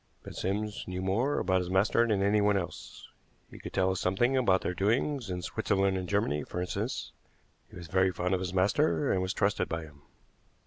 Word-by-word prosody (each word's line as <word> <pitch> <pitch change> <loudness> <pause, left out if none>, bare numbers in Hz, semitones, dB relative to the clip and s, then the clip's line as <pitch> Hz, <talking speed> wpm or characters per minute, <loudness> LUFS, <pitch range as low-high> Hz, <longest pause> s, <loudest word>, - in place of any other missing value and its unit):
But - - -9
Sims 105 +2 -2
knew 90 0 -4
more 115 +10 +1
about 95 0 +2
his 90 -1 -4
master 105 +5 +3
than 100 -3 +1
anyone 105 0 +3
else. 85 -3 -7 0.4
He - - -11
could - - -8
tell 95 -1 +2
us 95 - -2
something 120 +8 +1
about 100 -8 +3
their 90 - -2
doings 115 - 0
in 90 -1 -4
Switzerland 95 +1 0
and 95 -1 -4
Germany, 100 -8 0
for 90 - -6
instance. 90 - -3 0.6
He - - -15
was 85 - -8
very 95 +3 +2
fond 90 +1 -1
of 95 - +1
his 90 -2 -3
master, 105 +10 +2
and 95 - +1
was 95 0 -1
trusted 100 0 0
by 80 0 -3
him." 75 -2 -14
95 Hz, 205 wpm, -30 LUFS, 90-105 Hz, 0.6 s, master